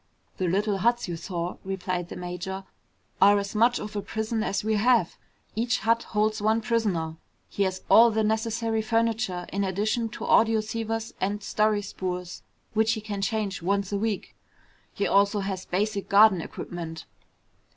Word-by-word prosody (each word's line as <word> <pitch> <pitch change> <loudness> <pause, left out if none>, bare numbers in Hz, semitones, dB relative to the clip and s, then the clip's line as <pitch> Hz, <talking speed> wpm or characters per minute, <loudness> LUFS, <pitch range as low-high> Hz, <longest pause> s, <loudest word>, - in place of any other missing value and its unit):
"The 185 - 0
little 200 +3 +1
huts 240 +3 +1
you 175 - -3
saw," 170 +1 -4
replied 185 -2 -3
the - - -7
major, 180 +2 -5 0.6
"are 205 +1 +7
as 200 0 -3
much 235 +3 +3
of 210 0 -7
a 205 - -1
prison 220 +2 -2
as 200 -2 -1
we 220 +1 +1
have. 230 -4 +3 0.4
Each 240 +3 +1
hut 230 +1 +2
holds 215 0 0
one 220 +2 +3
prisoner. 205 -9 -1 0.3
He - - -4
has 185 0 -3
all 235 +1 +8
the 220 0 0
necessary 225 +1 0
furniture, 225 -5 0
in 200 +1 0
addition 215 +4 0
to - - -8
audioceivers 225 0 +1
and 200 +2 -1
story 210 0 +1
spools 180 -2 -5 0.3
which 220 0 +3
he 220 - -4
can 205 -2 -4
change 205 -2 -1
once 200 +2 0
a 200 - 0
week. 215 -2 -3 0.6
He 200 - -2
also 200 +1 +3
has 190 -1 -4
basic 200 +2 -1
garden 200 -3 +6
equipment. 165 -1 -7
210 Hz, 160 wpm, -26 LUFS, 190-220 Hz, 0.6 s, all